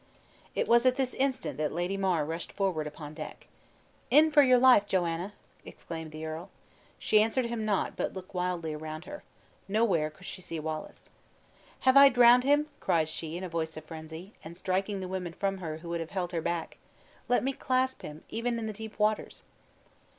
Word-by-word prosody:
It -, -, 0 dB
was 235 Hz, 0 st, +5 dB
at 255 Hz, -, +4 dB
this 260 Hz, -2 st, -1 dB
instant 260 Hz, -, -1 dB
that 150 Hz, -1 st, 0 dB
Lady 175 Hz, +4 st, -1 dB
Mar 185 Hz, -6 st, +1 dB
rushed 165 Hz, +3 st, -5 dB
forward 180 Hz, -6 st, -1 dB
upon 150 Hz, 0 st, -8 dB
deck. 155 Hz, -1 st, -8 dB, 0.6 s
"In 310 Hz, +1 st, +6 dB
for 295 Hz, -, +7 dB
your 255 Hz, -2 st, +6 dB
life, 245 Hz, -5 st, +6 dB
Joanna!" 175 Hz, +1 st, -1 dB, 0.3 s
exclaimed 160 Hz, -1 st, -8 dB
the 155 Hz, +1 st, -6 dB
earl. 160 Hz, +4 st, -6 dB, 0.5 s
She 215 Hz, -, +4 dB
answered 225 Hz, +3 st, +1 dB
him 235 Hz, -2 st, -3 dB
not, 205 Hz, -2 st, 0 dB
but -, -, -2 dB
looked 185 Hz, 0 st, -9 dB
wildly 180 Hz, -3 st, -2 dB
around 155 Hz, +2 st, -6 dB
her. 295 Hz, 0 st, -8 dB, 0.5 s
Nowhere 195 Hz, -7 st, +2 dB
could 170 Hz, +4 st, -16 dB
she 185 Hz, -, -7 dB
see 165 Hz, -2 st, -5 dB
Wallace. 155 Hz, 0 st, -6 dB, 0.7 s
"Have 260 Hz, +1 st, +5 dB
I 280 Hz, 0 st, +10 dB
drowned 245 Hz, 0 st, +6 dB
him?" 290 Hz, +2 st, +4 dB
cried 160 Hz, -2 st, +1 dB
she, 160 Hz, +1 st, -4 dB
in 185 Hz, -, -6 dB
a -, -, -3 dB
voice 160 Hz, -2 st, -3 dB
of 155 Hz, -, -8 dB
frenzy, 160 Hz, +4 st, -9 dB
and 170 Hz, +2 st, -10 dB
striking 190 Hz, +2 st, -1 dB
the 185 Hz, -, -4 dB
women 180 Hz, -2 st, -4 dB
from 195 Hz, +1 st, -2 dB
her, 160 Hz, -4 st, -4 dB
who 170 Hz, +1 st, -10 dB
would 170 Hz, 0 st, -2 dB
have 165 Hz, -1 st, -5 dB
held 180 Hz, -3 st, -3 dB
her 170 Hz, -2 st, -1 dB
back. 170 Hz, 0 st, -3 dB, 0.5 s
"Let 245 Hz, -, +3 dB
me 270 Hz, +1 st, 0 dB
clasp 260 Hz, 0 st, 0 dB
him, 150 Hz, +1 st, -9 dB
even 235 Hz, +1 st, -2 dB
in 225 Hz, -, -3 dB
the 215 Hz, -, -3 dB
deep 220 Hz, +1 st, -9 dB
waters!" 210 Hz, 0 st, 0 dB
185 Hz, 195 wpm, -29 LUFS, 160-230 Hz, 0.7 s, I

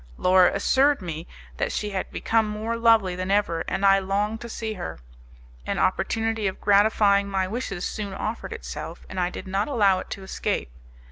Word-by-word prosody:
Laura 185 Hz, 0 st, +5 dB
assured 270 Hz, +8 st, +3 dB
me 170 Hz, -3 st, -6 dB, 0.3 s
that -, -, -1 dB
she 210 Hz, -1 st, -3 dB
had 190 Hz, -1 st, -3 dB
become 225 Hz, -1 st, +1 dB
more 215 Hz, +2 st, -3 dB
lovely 225 Hz, -5 st, +4 dB
than 185 Hz, +1 st, -4 dB
ever, 195 Hz, -5 st, +1 dB
and 195 Hz, -, -1 dB
I 195 Hz, 0 st, +6 dB
longed 205 Hz, +3 st, -1 dB
to 235 Hz, -, -7 dB
see 220 Hz, -1 st, -4 dB
her. 180 Hz, -4 st, -6 dB, 0.7 s
An -, -, -1 dB
opportunity 225 Hz, -2 st, 0 dB
of 190 Hz, -, -4 dB
gratifying 200 Hz, -1 st, +4 dB
my 190 Hz, -1 st, 0 dB
wishes 200 Hz, -4 st, -4 dB
soon 210 Hz, -2 st, -5 dB
offered 215 Hz, +4 st, -4 dB
itself, -, -, -7 dB
and 190 Hz, -, -5 dB
I 175 Hz, 0 st, +1 dB
did 185 Hz, -, -8 dB
not 195 Hz, +2 st, -1 dB
allow 205 Hz, -9 st, +3 dB
it -, -, -8 dB
to 195 Hz, -, -6 dB
escape. 190 Hz, -, -3 dB
200 Hz, 185 wpm, -25 LUFS, 190-220 Hz, 0.7 s, I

